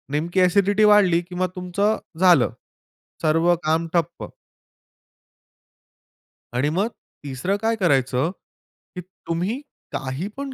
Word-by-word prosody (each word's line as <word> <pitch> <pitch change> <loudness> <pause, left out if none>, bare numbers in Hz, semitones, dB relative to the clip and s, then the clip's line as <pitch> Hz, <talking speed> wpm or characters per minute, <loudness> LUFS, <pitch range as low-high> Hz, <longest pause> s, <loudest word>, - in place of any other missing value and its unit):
नेमकी 170 +5 0
अ‍ॅसिडिटी 200 +3 +3
वाढली, 185 -5 +5
की 175 +1 -11
मग 185 +1 0
तुमचं 190 +4 0 0.2
झालं. 175 -9 +5 0.7
सर्व 165 +2 +3
काम 160 +1 +1
ठप्प. 170 -4 -2 2.2
आणि 130 +4 +1
मग 190 +7 0 0.4
तिसरं 145 +8 -2
काय 225 +1 +1
करायचं, 140 - +1 0.6
की 180 - -5
तुम्ही 185 +4 -4 0.3
काही 135 +6 -4
पण 275 -1 -5
175 Hz, 110 wpm, -22 LUFS, 155-195 Hz, 2.2 s, वाढली